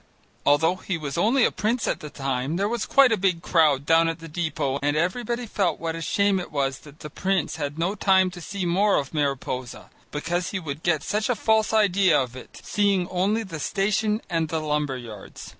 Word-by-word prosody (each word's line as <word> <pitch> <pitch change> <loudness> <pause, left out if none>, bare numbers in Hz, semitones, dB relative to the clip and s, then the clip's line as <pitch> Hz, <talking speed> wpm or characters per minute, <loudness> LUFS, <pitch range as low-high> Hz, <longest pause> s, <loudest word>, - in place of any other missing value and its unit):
Although 160 +5 +3
he 185 -1 -3
was 145 -3 -5
only 230 +8 +3
a - - +2
prince 225 +5 -1
at - - -1
the 150 - -8
time, 135 +1 -2
there 195 +3 0
was 235 0 -2
quite 275 -3 +5
a 220 - +3
big 180 -3 0
crowd 150 -5 +3
down 165 +1 +4
at 165 - -3
the 165 -1 -10
depot 150 -4 -2
and 145 +1 +1
everybody 235 +8 -1
felt 200 -4 -1
what 165 0 -3
a 165 - -6
shame 200 +3 +1
it 180 - -7
was 135 -2 -1
that 150 0 -16
the 150 - -7
prince 190 -2 -1
had 145 -1 -4
no 175 +4 0
time 190 -2 +3
to 175 -1 -10
see 190 +3 -4
more 195 +4 +3
of 140 +1 -3
Mariposa, 135 -4 -3 0.2
because 175 +4 -2
he 190 - -3
would 150 -3 -6
get 160 -4 +1
such 210 +2 -1
a 245 - +2
false 220 0 +2
idea 195 -6 +4
of 130 -2 -3
it, 130 - -11
seeing 200 -3 +1
only 200 +5 0
the 165 -6 -7
station 210 +6 0
and 165 -3 -1
the 160 - -1
lumber 150 -3 -1
yards. 110 -5 -10
170 Hz, 215 wpm, -24 LUFS, 150-200 Hz, 0.2 s, quite